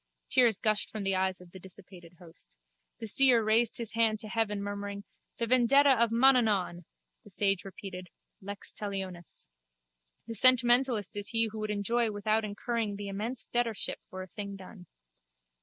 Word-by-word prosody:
Tears 235 -5 +3
gushed 215 0 +1
from 215 -2 -6
the 195 -1 0
eyes 190 0 -1
of 180 -1 -16
the 190 - -11
dissipated 180 -2 -12
host. 165 - -16 0.4
The 230 - -7
seer 240 +1 +5
raised 225 +2 +2
his 230 -2 -3
hand 225 -1 +2
to 220 - -6
heaven, 210 -3 -1
murmuring: 200 0 -6 0.3
The 235 - -1
vendetta 255 +4 +4
of 235 -3 +3
Mananaun! 225 -8 +2 0.4
The - - -16
sage 195 0 0
repeated: 185 -2 -9 0.3
Lex 200 +1 -3
talionis. 190 -4 -6 0.8
The 230 - -7
sentimentalist 245 -2 +3
is 205 0 -1
he 225 -1 +3
who 220 - -7
would 215 0 -4
enjoy 220 +3 0
without 215 +1 0
incurring 215 0 -3
the 200 0 -7
immense 220 +5 -4
debtorship 235 -4 -2
for 185 0 -7
a - - -11
thing 200 +1 -7
done. 185 -1 -13
210 Hz, 160 wpm, -29 LUFS, 195-230 Hz, 0.8 s, seer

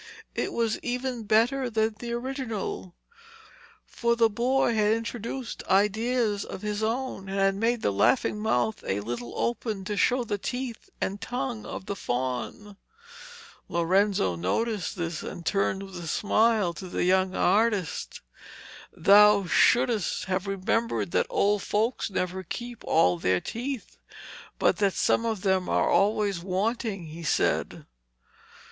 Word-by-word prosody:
It - - -2
was 230 -2 0
even 245 -2 -3
better 240 +5 +2
than 220 -1 0
the 240 -1 -5
original, 240 -7 -4 0.9
for 235 -1 0
the 230 -1 +3
boy 245 +3 +2
had 215 -1 +3
introduced 230 +2 -4
ideas 210 +2 +2
of 190 - -8
his 210 0 -2
own 225 -3 -2
and 195 - -3
had 195 0 +3
made 230 +3 0
the - - +2
laughing 110 - +2
mouth 215 - 0
a 100 +1 -1
little 120 +2 -5
open 220 -4 -2
to 210 - -2
show 250 +5 +2
the 205 -3 -3
teeth 245 +1 -5
and 200 +2 -2
the - - -5
tongue 245 -3 -3
of - - -6
the 200 - -3
faun. 130 - -4 0.9
Lorenzo 170 - +2
noticed 195 - -1
this, 170 -3 -3
and 170 - -7
turned 195 0 0
with 195 -2 -9
a - - -6
smile 215 0 +2
to 185 - -8
the - - -2
young 185 +1 +2
artist. 205 -2 +1 0.8
'Thou 205 +2 +6
shouldst 235 +3 +2
have 190 +1 -2
remembered 195 +1 -1
that - - +1
old 205 0 +2
folks 220 +4 0
never 185 -1 -2
keep 240 +6 -7
all 90 -1 +3
their 90 +1 +2
teeth, 245 - -5 0.6
but - - +2
that 200 -3 +2
some 230 - +2
of 220 -4 -2
them 190 -2 +1
are - - +2
always 200 -2 +2
wanting,' 195 +1 -2
he 160 +2 -9
said. 165 - 0
210 Hz, 145 wpm, -27 LUFS, 185-230 Hz, 0.9 s, Thou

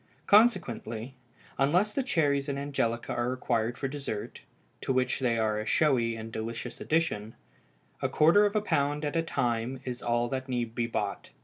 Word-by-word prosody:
Consequently, 135 - +2 0.5
unless 180 +10 +3
the 275 - +1
cherries 145 - +1
and 140 - -2
angelica 135 -5 -1
are 120 +1 0
required 120 -2 -1
for 135 - -2
dessert 135 -7 -5 0.4
(to - - -1
which 130 0 +1
they 120 -3 +1
are 110 -1 +1
a 110 - -4
showy 120 -7 +2
and 115 0 -7
delicious 115 +2 -5
addition), 135 -10 0 0.7
a - - 0
quarter 165 +7 +5
of 205 - -5
a 215 - +3
pound 145 -5 0
at 145 - -2
a 165 - +3
time 120 -4 -1
is 125 -1 -4
all 120 0 +1
that 130 +1 -4
need 120 -3 -2
be 120 -1 -1
bought. 105 -3 -3
130 Hz, 175 wpm, -29 LUFS, 115-145 Hz, 0.7 s, quarter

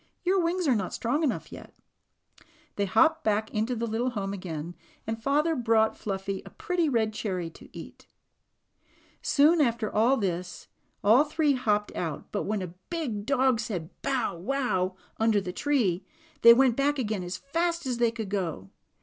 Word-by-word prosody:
"Your 370 +1 +2
wings 345 0 0
are 265 - +5
not 200 -5 -2
strong 245 +7 0
enough 295 -6 -1
yet." - - -11 1.0
They 200 - 0
hopped 320 - +3
back 215 0 0
into 220 +4 0
the 230 0 -2
little 230 +3 -1
home 200 -5 -3
again, 170 -3 -5 0.3
and 225 +1 -4
father 300 +6 +2
brought 225 -3 +2
Fluffy 195 -1 -4
a - - -11
pretty 350 -3 -1
red 220 -4 +1
cherry 185 -6 -3
to - - -15
eat. - - -11 1.1
Soon 310 +3 +4
after 235 -5 0 0.3
this 180 -3 -3 0.4
all 225 +8 +6
three 300 -1 +1
hopped 210 -5 0
out, 160 -4 -4
but 205 - -2
when 210 -2 -1
a 175 -2 -7 0.2
big 255 -12 -3
dog 260 -3 +3
said 195 -9 -4
"bow 265 -9 -1
wow," 190 -3 -1 0.2
under 220 -2 +3
the 185 -2 -5
tree, 210 -10 +1 0.4
they 235 - +10
went 255 -2 +4
back 285 +2 +1
again 215 -6 -2
as 180 +1 -4
fast 335 +3 -1
as 250 -2 -2
they 235 -1 +4
could 225 -3 -5
go. 165 - -3
225 Hz, 165 wpm, -27 LUFS, 195-275 Hz, 1.1 s, they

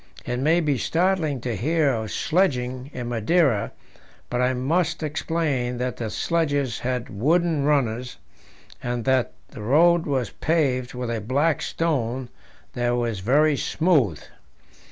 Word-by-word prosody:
It 125 0 -2
may 160 +6 +3
be 145 -5 0
startling 165 -5 0
to 120 -2 -2
hear 150 - +1
of 110 -2 -3
sledging 130 -7 0
in 125 -3 -5
Madeira, 120 - +2 0.6
but 125 - 0
I 125 +1 +2
must 165 +6 0
explain 150 -5 -1
that 125 0 -3
the 115 -2 -3
sledges 145 -5 0
had 125 -1 -3
wooden 155 - +1
runners, 125 -4 0 0.6
and 120 -1 -3
that 130 -2 +2 0.2
the 125 - -10
road 165 +9 +4
was 130 -6 -1
paved 135 -6 0
with 125 -1 -3
a 115 -2 -2
black 140 +8 +1
stone 130 -6 -1 0.4
that 120 0 0
was 120 -4 -1
very 145 +9 +3
smooth. 140 - +1
130 Hz, 135 wpm, -24 LUFS, 120-160 Hz, 0.6 s, road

